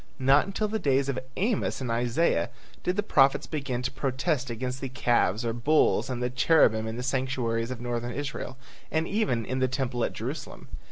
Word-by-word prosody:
Not 135 +5 +4
until 205 +2 -1
the 220 +1 -2
days 140 -3 +2
of 130 - -1 0.2
Amos 210 +2 0
and 125 -3 -3
Isaiah 120 - +1 0.3
did 180 - 0
the 210 - 0
prophets 135 -9 +4
begin 135 -5 -3
to 125 - -1
protest 135 0 -1
against 125 +2 -4
the 135 - -3
calves 120 -3 +1
or 115 - 0
bulls 140 +4 +2
and 125 -1 -2
the 125 - 0
cherubim 125 -5 +4
in 110 +1 -4
the 125 - -4
sanctuaries 125 -3 -1
of 130 -2 -5
Northern 120 0 -3
Israel, 135 0 -5 0.3
and 160 +1 0
even 195 - 0
in 130 +4 -2
the 130 - +3
temple 130 -2 -2
at - - -1
Jerusalem. - - -6
130 Hz, 190 wpm, -27 LUFS, 120-140 Hz, 0.3 s, Not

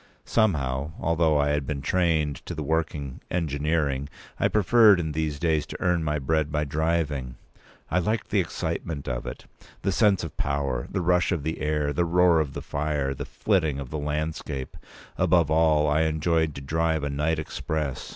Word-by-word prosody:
Somehow, 75 - 0
although 80 -2 +2
I 70 0 +2
had 75 -2 0
been 70 -2 -3
trained 80 -4 +1
to 90 - -4
the 75 - -3
working 80 -3 -2
engineering, 75 -3 -1 0.3
I - - +3
preferred 105 -1 +5
in 80 -2 -2
these 75 -1 -2
days 80 -2 0
to - - -7
earn 90 -2 +1
my 75 -1 0
bread 75 +2 0
by 75 0 0
driving. 75 -4 -1 0.6
I 90 - +3
liked 105 +4 -2
the - - +3
excitement 75 -4 -3
of 65 0 -3
it, - - -7 0.4
the 95 - +1
sense 95 +1 +3
of 80 - -6
power, 70 -3 -1
the 95 - -2
rush 90 +2 +2
of 85 -6 -1
the 80 +2 -3
air, 75 -1 0
the 85 - +1
roar 85 0 +4
of 75 -3 -1
the - - -6
fire, 70 -2 -1
the - - -6
flitting 80 -9 0
of 70 -3 -7
the 75 - -3
landscape. 75 -2 -3 0.4
Above 85 -4 +3
all, 80 -1 +4
I 75 +1 +2
enjoyed 80 0 +1
to 70 - -6
drive 80 +2 0
a 75 - -1
night 75 +3 0
express. 75 -2 -3
75 Hz, 180 wpm, -26 LUFS, 70-85 Hz, 0.6 s, preferred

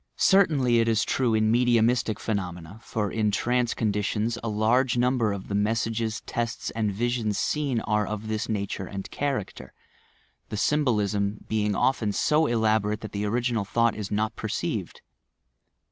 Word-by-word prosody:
Certainly 145 -11 +4
it 115 - +2
is 110 -1 +2
true 120 -4 +1
in 110 0 +2
medium 120 -1 +4
istic 115 -3 0
phenomena, 90 -2 -4
for 105 -4 -3
in 110 -1 +1
trance 120 +4 0
conditions 105 +1 0
a 115 - -2
large 115 +4 +2
number 120 -3 +2
of 100 -1 -5
the - - -5
messages, 110 +2 0
tests 120 0 -3
and 110 -2 -1
visions 115 0 -1
seen, 140 -6 0
are 105 -1 0
of 105 0 -5
this 110 +1 -2
nature 100 -2 -3
and 100 -1 -7
character— 135 -9 -4 0.7
the 105 - -4
symbolism 105 -7 0
being 105 -2 0
often 115 -4 +1
so 155 +7 +2
elaborate 110 -2 +1
that 110 - -7
the 100 0 -2
original 120 0 0
thought 115 +3 +1
is 105 -2 -5
not 110 +1 -1
perceived. - - -3
110 Hz, 155 wpm, -26 LUFS, 105-120 Hz, 0.7 s, Certainly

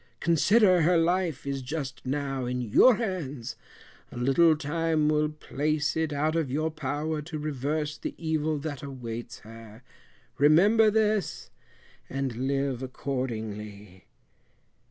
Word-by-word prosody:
Consider 185 +3 +4
her 170 +2 +4
life 170 -3 0
is 140 -1 -3
just 135 -1 -5
now 135 -1 -2
in 125 +1 -2
your 125 - +5
hands, 165 - -4 0.6
a - - -9
little 150 +6 +4
time 155 +1 0
will 150 0 +2
place 150 0 -2
it 160 -1 0
out 150 +2 0
of 160 -5 0
your 155 +4 -1
power 150 +2 -3
to 155 +1 -6
reverse 150 +1 -3
the - - -5
evil 155 -1 -1
that 145 -2 -5
awaits 120 -4 -7
her. 115 +1 -13 0.6
Remember 200 +10 +5
this, 215 -3 0 0.6
and 135 -3 -3
live 135 -2 -1
accordingly." 110 -7 -5
150 Hz, 125 wpm, -27 LUFS, 130-160 Hz, 0.6 s, your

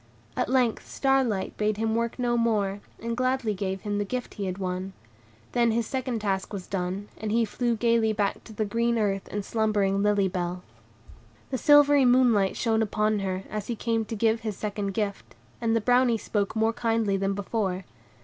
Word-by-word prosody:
At - - -1
length 250 -3 +1
Star 270 -1 +2
Light 205 -6 -2
bade 210 -1 0
him 220 0 0
work 230 0 -1
no 240 -1 +1
more, 210 -4 +1 0.2
and 230 0 -2
gladly 255 -3 0
gave 190 -1 -3
him 205 -1 -2
the - - +1
gift 250 +5 -4
he 200 - -4
had 185 0 -3
won. 185 0 -3 0.6
Then 235 -1 +3
his 230 +1 +1
second 255 -2 -3
task 195 -2 -1
was 195 -3 -5
done, 190 +1 -3
and 215 -1 -3
he 230 +1 +3
flew 235 +2 -1
gayly 230 -1 +2
back 205 -2 -1
to 220 - -11
the 215 +1 -1
green 235 +3 0
earth 195 -3 0
and 205 -1 -4
slumbering 205 -3 +1
Lily 205 -1 +3
Bell. 180 -1 -3 0.9
The 260 - -1
silvery 290 0 +6
moonlight 245 -6 +4
shone 225 -2 +1
upon 215 0 +1
her, 190 -1 -2
as 210 -2 -5
he 235 - -2
came 225 0 0
to 225 - -5
give 225 +1 +2
his 215 -3 -4
second 205 -2 -3
gift; 205 -2 -3 0.3
and 230 -1 +1
the - - +3
Brownie 245 +1 +3
spoke 205 -1 -2
more 220 +1 +2
kindly 225 -3 0
than 195 0 0
before. 195 -2 -2
215 Hz, 195 wpm, -27 LUFS, 200-235 Hz, 0.9 s, silvery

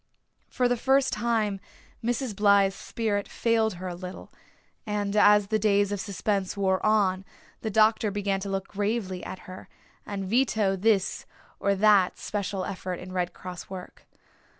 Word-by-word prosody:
For 250 - +1
the 245 0 +1
first 265 +2 +2
time 215 -3 0 0.4
Mrs. 240 -1 -1
Blythe's 200 -1 +4
spirit 210 -3 -2
failed 225 -3 +1
her 185 +1 -6
a 180 - -4
little, 180 +1 -9 0.5
and 210 -2 -2
as 210 -1 +5
the 220 -1 +1
days 205 -1 +2
of 205 - -2
suspense 195 0 -2
wore 190 -1 +1
on 195 -3 +2 0.4
the 220 - -2
doctor 220 +1 +3
began 200 -1 -1
to 200 +1 -5
look 195 0 -2
gravely 205 -2 -2
at 185 - -7
her, 185 0 -10 0.3
and 200 -1 -5
veto 215 -3 +2
this 195 0 +1 0.3
or 200 0 +1
that 200 -2 +4
special 200 -2 -3
effort 185 -1 -4
in 180 +1 -9
Red 180 -1 -1
Cross 180 -1 -9
work. 185 -1 -10
200 Hz, 155 wpm, -27 LUFS, 190-215 Hz, 0.5 s, as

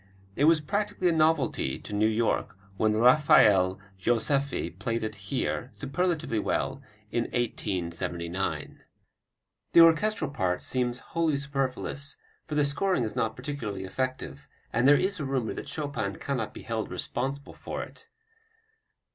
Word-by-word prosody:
It 145 - +3
was 160 -1 +5
practically 190 +2 0
a - - +3
novelty 155 - +2
to - - -9
New 105 +1 +3
York 110 -3 0 0.2
when 110 +2 +2
Rafael 110 -7 +5 0.2
Joseffy 120 - 0
played 115 -1 -1
it 110 0 -2 0.2
here, 125 -1 -1
superlatively 150 -4 -1
well, - - -1 0.3
in 120 +1 0
1879. 90 -5 -3 0.9
The 170 - +9
orchestral 165 0 +4
part 95 -9 -1
seems 125 -1 -1
wholly 165 -3 +2
superfluous, 140 0 -2 0.3
for 155 - -4
the 150 -1 +4
scoring 145 +2 +1
is 110 -2 -3
not 110 0 0
particularly 125 -8 -5
effective, 110 - -4 0.3
and 120 +3 +3
there 145 +1 +7
is 190 0 0
a - - -2
rumor 135 -4 -1
that - - -7
Chopin 140 -10 -3
cannot 125 -6 -3
be - - -10
held - - -3
responsible 135 +2 -3
for - - -5
it. - - -13
130 Hz, 140 wpm, -28 LUFS, 110-150 Hz, 0.9 s, The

